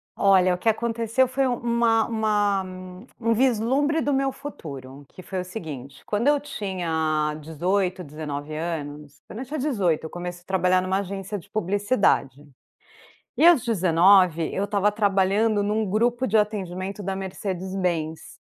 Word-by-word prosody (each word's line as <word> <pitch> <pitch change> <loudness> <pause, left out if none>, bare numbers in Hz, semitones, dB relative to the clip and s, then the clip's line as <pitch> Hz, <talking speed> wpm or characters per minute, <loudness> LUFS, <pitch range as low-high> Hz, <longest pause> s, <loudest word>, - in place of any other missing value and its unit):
Olha, 185 -2 +4
que 180 - -5
aconteceu 230 +2 +1
foi 265 +2 0
uma 235 -2 +1
uma 210 -3 +1 0.6
um 230 -1 +2
vislumbre 265 +6 +2
do 290 - 0
meu 270 0 +1
futuro, 140 - -9
que - - -12
foi 185 +1 -4
o - - -5
seguinte, 145 - -8
quando 210 +5 0
eu 290 0 +4
tinha 165 - -2
18, 180 +4 -1
19 150 -1 -6
anos, 150 -3 -5
quando 220 - -8
eu 260 - -5
tinha 295 +4 -5
18 200 - 0
eu - - -5
comecei 175 +1 -6
a - - -28
trabalhar 185 -1 +2
em - - -4
uma 190 +1 +1
agência 200 +1 -5
de 200 +1 -13
publicidade. 200 - +1 0.9
E 320 - +5
aos 340 -8 +7
19 180 -4 +4
eu 195 - 0
estava 205 0 +1
trabalhando 205 +1 +2
em 205 - -1
um 220 +1 +1
grupo 240 +5 +1
de 220 - +1
atendimento 195 -2 -2
da 195 0 -2
Mercedes 190 -1 -5
Benz. 165 -4 -3
195 Hz, 155 wpm, -24 LUFS, 175-225 Hz, 0.9 s, aos